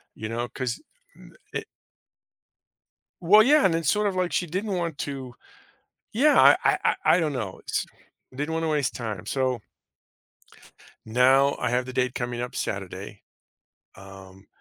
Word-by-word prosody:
you 110 - -6
know, 120 +1 -3
'cause 130 -3 -4 0.3
n - - -17 0.2
it - - -3 1.6
Well, 210 +5 +7
yeah. 295 +5 +5
And 185 - +3
then 165 0 -1
sort 210 +8 +2
of 195 - -2
like 185 -1 0
she 180 - +1
didn't 190 +5 -3
want 170 -4 -3
to 130 -3 -6 0.8
Yeah. 290 +7 +4
I - - +8
I - - +3
I - - +2 0.2
I - - +1
don't 155 -3 -1
know. 110 -8 -5
S - - -1 0.5
Didn't 150 +4 -3
want 165 0 -1
to - - 0
waste 150 -4 0
time. 110 -7 -5
So 130 -3 -1 1.5
now 130 +4 +4
I - - -1
have 125 +1 0
the 130 - -8
date 125 -1 0
coming 120 -1 -3
up 125 - -6
Saturday, 100 +1 -5 0.7
um, 95 0 -14
130 Hz, 160 wpm, -25 LUFS, 115-165 Hz, 1.6 s, I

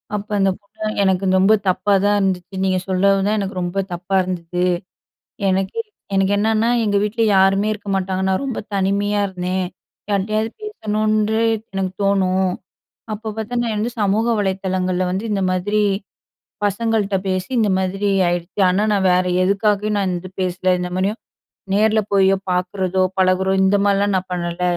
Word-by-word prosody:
அப்போ, 210 +1 -5
அந்த 195 0 +3
பொண்ணு 215 +2 -12 0.2
"எனக்கு 190 0 +1
ரொம்ப 195 +3 +5 0.2
தப்பா 185 +2 +1
தான் 205 0 +3
இருந்துச்சு. 190 -1 -2
நீங்க 185 -1 +1
சொல்லவும் 195 +1 +2
தான் 215 +1 +1
எனக்கு 195 -1 -4
ரொம்ப 175 +2 -2
தப்பா 180 +2 -1
இருந்தது. 180 -1 -2 0.8
எனக்கே 190 - 0 0.3
எனக்கு 195 +1 +2
என்னன்னா 220 +2 +2 0.2
எங்க 205 -1 +1
வீட்ல 215 +2 -1
யாருமே 195 +2 +3
இருக்க 205 -1 -8
மாட்டாங்க. 190 0 -2
நான் 190 +7 0
ரொம்ப 260 -4 -3
தனிமையா 200 +2 +1
இருந்தேன் 185 0 -2 0.4
யார்ட்டயாது 215 +3 0
பேசணுன்டு 215 - 0 0.3
எனக்கு 190 -1 -2
தோணும். 190 -2 +2 0.6
அப்போ 220 +1 -7
பார்த்தா 220 +3 -4
நான் 230 -2 -1
வந்து 225 +3 -1
சமூக 205 +2 +2
வலைதளங்கள்ல 185 -2 -1
வந்து 190 +4 -2
இந்த 195 -1 0
மாதிரி 205 +4 0 0.9
பசங்கள்ட்ட 205 -1 0
பேசி 185 +2 -2
இந்த 215 -2 +3
மாதிரி 195 +2 -1 0.2
ஆயிடுச்சு. 175 +3 -3
ஆனா, 185 +3 +2
நான் 195 -2 +2
வேற 180 0 +3 0.2
எதுக்காகயும் 205 +2 +1
நான் 190 -2 0
இந்த 185 +2 -7
பேசல 185 0 0
இந்த 180 - -2
மாதிரியும் 195 +5 -1 0.5
நேரல 215 +1 +3
போயோ, 195 -1 +4 0.2
பார்க்குறதோ, 185 +1 0 0.2
பழகுறோ 185 0 +2
இந்த 190 +1 +3
மாரிலாம் 200 0 +2
நான் 185 0 -2
பண்ணல. 175 0 -3
195 Hz, 150 wpm, -20 LUFS, 185-210 Hz, 0.9 s, ரொம்ப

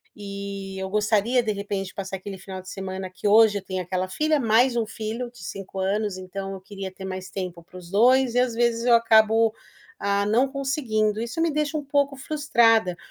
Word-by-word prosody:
e 200 -1 -6
eu 190 0 -4
gostaria, 215 +4 +2
de 215 - 0
repente, 200 -1 -3
de - - -11
passar 195 -1 -5
aquele 195 +1 -8
final 190 0 -8
de 185 - -12
semana 190 -1 -5
que 205 - -4
hoje 215 0 +6
eu - - -15
tenho 185 -1 -3
aquela 185 +1 -2
filha, 305 +9 +1
mais 240 +2 +3
um 230 -2 +1
filho 225 +2 -4
de 245 - -14
5 195 +2 -7
anos, 200 0 -1
então 195 +1 -6
eu 190 - -8
queria 195 -1 -7
ter 190 0 -9
mais 185 0 -6
tempo 180 -3 -5
para 185 - -14
os 175 -1 -11
dois 250 +3 +4
e - - +4
às 250 -2 +1
vezes 235 0 +1
eu 240 -1 +6
acabo, 225 -1 +4 0.5
hã, 200 0 +1
não 235 +6 +3
conseguindo. 255 -6 -1
Isso 235 +7 -4
me 330 -1 +2
deixa 300 +1 -1
um 295 - -4
pouco 280 0 +1
frustrada. 230 - +2
210 Hz, 210 wpm, -24 LUFS, 190-240 Hz, 0.5 s, hoje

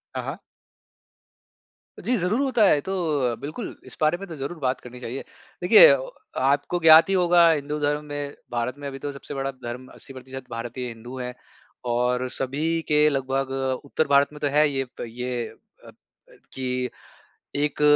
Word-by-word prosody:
हाँ, - - -2
हाँ। - - -5 1.7
जी, 250 - +1
ज़रूर 190 +5 0
होता 260 -5 +2
है। 150 - +5
तो 190 - -4 0.4
अ, - - -3
बिल्कुल 155 +10 -6
इस - - -10
बारे 155 +2 +3
में 195 +2 -8
तो 165 - -6
ज़रूर 145 +4 -5
बात 130 -2 0
करनी 125 0 -10
चाहिए। 125 +2 -5 0.4
देखिए 450 - +9 0.5
आपको 145 +6 +1
ज्ञात 160 +1 +8
ही - - +2
होगा 175 -2 +5
हिंदू 150 -1 -2
धर्म 150 0 0
में 145 -1 -5 0.2
भारत 120 +1 -1
में 145 - -5
अभी 135 -1 -6
तो 145 - -4
सबसे 140 +1 -8
बड़ा 135 0 -2
धर्म 120 +2 -6
80 135 - -12
प्रतिशत 130 0 -9
भारतीय 120 +2 -4
हिंदू 120 +2 -9
है। 125 0 -4 0.5
और 125 +1 +1
सभी 155 +5 -1
के 150 0 +4
लगभग 135 -1 -1 0.3
उत्तर 155 +2 0
भारत 140 0 +5
में 150 - -10
तो 145 - 0
है 150 0 +5
ये, 135 -1 -1 0.2
प - - -3
ये 125 +1 -4 0.4
अ - - -11
अ, - - -12 0.6
कि 125 -1 -2 0.7
एक 145 0 -1
140 Hz, 175 wpm, -24 LUFS, 125-155 Hz, 1.7 s, देखिए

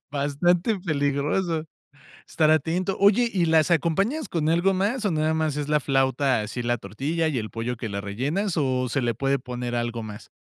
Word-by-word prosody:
Bastante 170 +8 +1
peligroso. 155 +1 0 0.6
Estar 155 -1 +2
atento. 175 +4 0
Oye, 210 +4 +4
¿y 180 -3 +2
las 160 +1 +3
acompañas 195 - +1
con 160 -3 -1
algo 175 +4 +3
más 210 +6 -1
o 205 - +2
nada 155 0 +1
más 155 -2 -1
es 145 0 -3
la 150 0 +3
flauta 135 -2 +1
así 110 +4 -5
la 120 0 0
tortilla 140 - -2
y 145 -5 -1
el 110 -1 -5
pollo 120 +2 -4
que 115 -1 -5
la 100 0 -4
rellenas 145 - -2
o 130 -3 +1
se 140 - 0
le 120 -2 0
puede 135 +3 0
poner 125 -1 -5
algo 120 -1 -2
más? 105 -1 -9
150 Hz, 190 wpm, -25 LUFS, 125-170 Hz, 0.6 s, Oye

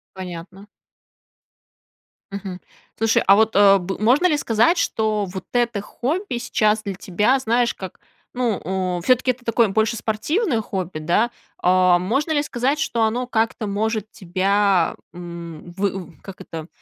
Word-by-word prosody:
Понятно. 185 +2 -8 1.6
Мгм. 195 -2 -6 0.4
Слушай, 225 0 +2
а 195 - +7
вот, 220 0 +2
э, 200 -1 +7
б 190 +1 -4
можно 255 +11 +4
ли 300 -4 +2
сказать, 240 +8 +2
что 215 -7 0
вот 185 -1 -7
это 240 -4 +1
хобби 295 - -3
сейчас 215 -2 +1
для 200 -2 -3
тебя, 210 +9 +1
знаешь, 240 -1 +1
как, 190 -2 -9 0.3
ну, 245 -5 -1 0.4
у, - - -5
всё-таки 255 +6 +3
это 245 0 -11
такое 230 -2 +2
больше 220 +3 +1
спортивное 230 - 0
хобби, 185 -6 -4
да? 195 +10 +1 0.3
А 180 0 +4
можно 270 - -1
ли 290 -1 +2
сказать, 270 +3 -1
что 235 -7 0
оно 235 +3 0
как-то 225 -2 -1
может 215 +1 -2
тебя, 195 0 +1 0.2
м, 170 -1 -9
вы 195 0 -1
в 160 - -19
как 195 -2 -11
это, 160 0 -8
215 Hz, 150 wpm, -21 LUFS, 190-240 Hz, 1.6 s, а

